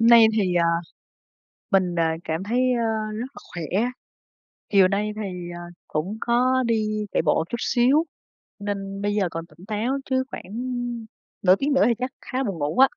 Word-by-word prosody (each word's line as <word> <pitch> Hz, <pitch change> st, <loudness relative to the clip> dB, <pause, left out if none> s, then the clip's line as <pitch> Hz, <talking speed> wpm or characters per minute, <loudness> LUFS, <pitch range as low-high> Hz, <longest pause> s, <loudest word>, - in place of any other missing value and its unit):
hôm 230 Hz, -, +5 dB
nay 230 Hz, -1 st, +9 dB
thì, 195 Hz, -5 st, +1 dB
à, 170 Hz, -1 st, +4 dB, 1.1 s
mình, 185 Hz, -3 st, +3 dB
à, 160 Hz, -1 st, +2 dB
cảm 160 Hz, +3 st, -2 dB
thấy, 235 Hz, +5 st, 0 dB
ờ, 220 Hz, -2 st, 0 dB
rất 220 Hz, +3 st, -3 dB
là -, -, -10 dB
khỏe, 185 Hz, +8 st, 0 dB, 0.8 s
chiều 195 Hz, -3 st, +6 dB
nay 205 Hz, +2 st, 0 dB
thì, 180 Hz, -5 st, -5 dB
à, -, -, -7 dB, 0.3 s
cũng 180 Hz, +8 st, -2 dB
có 255 Hz, +2 st, +3 dB
đi 215 Hz, -2 st, 0 dB
chạy -, -, +2 dB
bộ 150 Hz, -2 st, +2 dB
một 160 Hz, -, -1 dB
chút 235 Hz, -, -2 dB
xíu, 260 Hz, +8 st, +3 dB, 0.6 s
nên 200 Hz, -1 st, -4 dB
bây 205 Hz, 0 st, 0 dB
giờ 200 Hz, -4 st, +2 dB
còn 165 Hz, 0 st, -5 dB
tỉnh 170 Hz, +4 st, -17 dB
táo, 225 Hz, +6 st, -1 dB
chứ 260 Hz, 0 st, +2 dB
khoảng 190 Hz, -, -8 dB, 0.9 s
nửa 185 Hz, -1 st, +7 dB
tiếng 280 Hz, +7 st, 0 dB
nữa 270 Hz, -, +4 dB
thì 235 Hz, -, +3 dB
chắc 255 Hz, +1 st, -2 dB
khá 255 Hz, -, -4 dB
là 270 Hz, -, +1 dB
buồn 195 Hz, -7 st, -3 dB
ngủ 145 Hz, +9 st, -2 dB
á. 265 Hz, +1 st, +8 dB
210 Hz, 195 wpm, -24 LUFS, 180-235 Hz, 1.1 s, nay